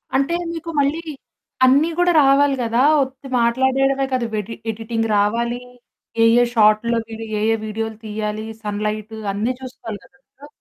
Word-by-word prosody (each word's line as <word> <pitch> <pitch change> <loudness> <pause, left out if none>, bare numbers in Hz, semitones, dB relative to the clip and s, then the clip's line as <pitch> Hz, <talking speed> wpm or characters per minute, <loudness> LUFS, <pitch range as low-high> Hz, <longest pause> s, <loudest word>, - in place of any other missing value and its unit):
అంటే 275 +5 +1 0.2
మీకు 335 0 -6
మళ్ళీ 285 +3 +1 0.7
అన్నీ 280 +6 +4
గూడా 355 0 +3
రావాలి 275 +1 +4
గదా! 230 +2 +1 0.2
ఒట్టి 270 +1 -5
మాట్లాడడమే 265 +3 +2
కాదు, 250 -2 0
వెడి 210 +2 -4 0.2
ఎడిటింగ్ 225 +1 -3
రావాలి, 235 +4 0 0.6
ఏ - - +6 0.2
ఏ - - +5
షాట్‌లోకెళ్ళి 225 +1 +2
ఏ - - -2
ఏ - - +2
వీడియోలు 220 0 -4
తీయాలి, 215 0 -4 0.2
సన్ 210 0 -3
లైట్ 215 +1 -4 0.2
అన్నీ 220 +6 -1
చూసుకోవాలి 245 -5 -8
గదా! 270 +4 -19
235 Hz, 140 wpm, -20 LUFS, 215-270 Hz, 0.7 s, ఏ